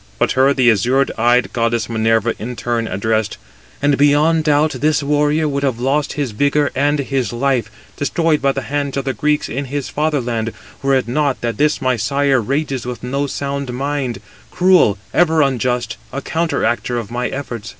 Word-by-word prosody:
But - - +1
her 135 +2 +4
the 130 -4 +4
azure 125 +7 +2
eyed 120 +2 +2
goddess 115 -2 0
Minerva 115 0 +1
in 125 +3 -5
turn 120 -1 -2
addressed: 110 +2 -1 0.5
"And 145 -1 +2
beyond 150 +3 +3
doubt 150 +1 +3
this 150 -1 +2
warrior 150 +2 +1
would 140 -1 -2
have 130 -4 -1
lost 140 +4 0
his 140 -4 -2
vigour 145 +5 +1
and 145 +2 +2
his 135 -4 -1
life, 125 -1 0 0.3
destroyed 155 +2 +1
by 135 0 +2
the 135 - -4
hands 140 0 -2
of 135 - -2
the 135 - -1
Greeks 150 0 0
in 140 +4 -4
his 140 +1 -4
fatherland, 120 -7 -1 0.3
were 135 0 +2
it 130 -3 0
not 140 +2 0
that 120 -1 -2
this 150 -1 +1
my 130 -1 +1
sire 140 +3 +1
rages 135 +1 -2
with 125 -1 -6
no 140 +3 -1
sound 140 -1 -3
mind; 135 -1 -2 0.3
cruel, 180 - +4 0.2
ever 160 -3 +4
unjust, 125 -3 -1
a 140 - -3
counteractor 140 -6 -1
of 115 -2 -5
my 125 +1 -1
efforts. 120 -5 -6
135 Hz, 180 wpm, -18 LUFS, 120-145 Hz, 0.5 s, her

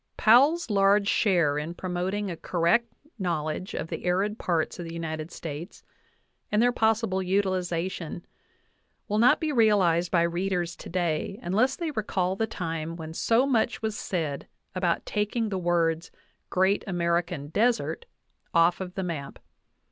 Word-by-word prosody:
Powell's 270 +6 +5
large 200 0 +4
share 170 -10 +2
in 160 +3 -5
promoting 185 +3 -2
a - - -4
correct 185 +9 +1 0.3
knowledge 170 -1 -2
of - - -4
the - - -5
arid 195 +4 0
parts 170 0 -1
of 175 - -5
the 165 - -7
United 160 -1 -4
States 165 +2 -8 0.7
and 210 - +2
their 245 +2 +4
possible 220 -4 +1
utiliza 185 -2 0
tion 170 0 -7 0.8
will 210 +1 0
not 240 +2 +5
be 315 -1 -1
realized 195 - +3
by 170 -2 +3
readers 175 0 -1
today 175 +2 -2
unless 225 +9 +2
they 335 -3 -3
recall 190 -6 -1
the 220 +3 -1
time 165 -5 -4
when 160 -1 -7
so 230 +9 +2
much 235 -4 0
was 220 -1 -1
said 160 -9 -3 0.3
about 180 -2 0
taking 210 +2 -1
the 190 -2 -2
words 170 -1 +1 0.4
"Great 190 +2 +2
American 170 -4 -1
Desert" 240 - 0 0.5
off 170 +2 +4
of 180 0 -6
the 190 - -2
map. 160 -6 -5
185 Hz, 150 wpm, -27 LUFS, 170-210 Hz, 0.8 s, Powell's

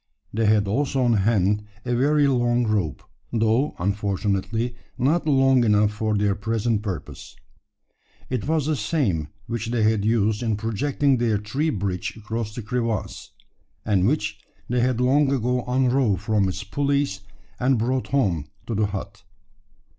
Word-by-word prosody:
They 110 0 +1
had 105 -1 +3
also 135 +4 0
on 120 -1 +3
hand 105 -1 +2 0.2
a 120 - -1
very 145 +4 +3
long 120 -2 +2
rope, 100 - -1 0.3
though, 115 +5 +1
unfortunately, 100 +4 -1 0.2
not 150 +6 +1
long 135 -3 +4
enough 105 -1 +3
for 110 0 -1
their 100 -1 +2
present 110 +1 -1
purpose. 95 -6 -6 0.9
It 125 -1 -3
was 155 -2 +1
the 155 0 +1
same 100 - 0 0.2
which 115 0 -4
they 115 -1 0
had 110 -1 +2
used 110 -1 +1
in 110 -3 0
projecting 130 +5 +1
their 115 -3 +1
tree 130 +10 -1
bridge 95 - -3
across 110 0 -4
the 120 - -5
crevasse; 115 -1 -3 0.6
and 100 -3 +2
which 105 -6 -1 0.3
they 125 +1 0
had 125 0 +1
long 135 +3 +3
ago 125 -1 0
unrove 125 -5 +2
from 105 -2 +1
its 95 +2 -5
pulleys, 140 -1 0 0.4
and 130 +1 +2
brought 125 +3 -1
home 95 - 0 0.2
to 115 - -4
the 105 0 +1
hut. 100 0 -6
115 Hz, 150 wpm, -24 LUFS, 105-130 Hz, 0.9 s, long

